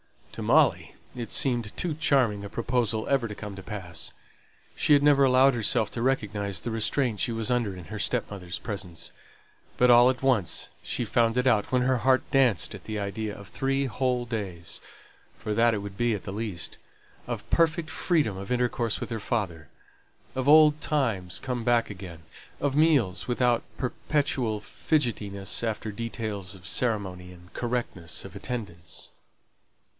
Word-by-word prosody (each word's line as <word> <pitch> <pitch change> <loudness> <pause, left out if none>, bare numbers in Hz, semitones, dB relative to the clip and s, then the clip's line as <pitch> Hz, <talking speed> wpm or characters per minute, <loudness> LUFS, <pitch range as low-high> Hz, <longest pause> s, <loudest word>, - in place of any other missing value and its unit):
To - - -7
Molly - - +3 0.2
it 120 -3 -6
seemed 120 -6 +2
too 175 -3 -1
charming 130 -9 +2
a 100 - -6
proposal 115 -1 0
ever 135 -4 +2
to 105 - -7
come 105 -1 -7
to 95 - -8
pass. 90 -6 -6 0.6
She - - +3
had 145 -1 +5
never 145 -1 +5
allowed 130 +1 +5
herself 110 -1 +1
to 115 - -4
recognize 105 -6 -1
the 120 - -3
restraint 115 0 +1
she 120 - 0
was 115 +1 -1
under 120 -6 0
in 90 -2 -9
her 105 +3 -6
stepmother's 100 -8 -2
presence; 95 -6 -5 0.7
but 125 0 +6
all 120 +1 +8
at 130 0 -2
once 120 -9 +2
she 120 - -2
found 115 +1 +2
it 125 - +2
out 110 -5 +2
when 125 -1 +3
her 130 0 +2
heart 130 +2 +3
danced 125 - +3
at - - -10
the 110 -1 -4
idea 105 +1 -3
of 100 0 -11
three 135 0 0
whole 125 +1 0
days 95 -8 -5 0.6
for 105 - -3
that 115 +1 +4
it - - -2
would 100 -1 -8
be 120 -2 +2
at 100 - -7
the 95 - -6
least 105 -5 -2 0.5
of - - -5
perfect 165 -1 +2
freedom 150 - +1
of 100 +3 -7
intercourse 120 -2 0
with - - -5
her 115 - -2
father; 95 -9 -2 0.7
of 130 0 -2
old 155 0 +7
times 110 - 0
come 125 -3 -3
back 120 -2 +2
again; 90 -4 -9 0.4
of 140 -1 0
meals 140 - +3
without 120 -1 +2
perpetual 125 -4 -1
fidgetiness 105 -5 -1
after 110 -1 -2
details 105 -3 -4
of 90 -3 -12
ceremony 95 -6 -1
and 90 0 -16
correctness 120 -10 -3
of 95 0 -10
attendance. 100 -6 -6
115 Hz, 165 wpm, -27 LUFS, 100-125 Hz, 0.7 s, all